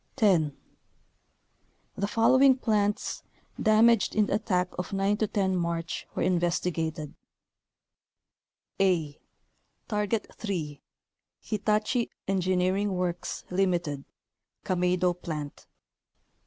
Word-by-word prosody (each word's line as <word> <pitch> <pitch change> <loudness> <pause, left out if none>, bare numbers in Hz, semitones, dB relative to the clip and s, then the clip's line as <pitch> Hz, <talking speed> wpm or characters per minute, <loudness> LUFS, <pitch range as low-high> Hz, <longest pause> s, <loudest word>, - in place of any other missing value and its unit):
The 180 -8 +4 1.6
following 260 +5 +5
plants, 210 -4 0 0.4
damaged 220 0 +4
in 210 -1 +4
the - - -2
at 215 - -2
tack 180 -3 +1
of 180 +2 -4
9 195 +1 +1
10 200 -3 0
March, 170 -1 -3
were - - 0
investigated: 170 -3 -1 1.7
a. 165 -7 +1 0.7
Target 210 0 -1
3, 155 -9 -4 0.6
Hitachi 215 +3 0 0.2
Engineering 185 +1 +1
Works, 180 -1 -3
Ltd., 175 -7 0 0.6
Kameido 180 -1 +1
Plant. 150 -3 -6
185 Hz, 85 wpm, -28 LUFS, 175-210 Hz, 1.7 s, following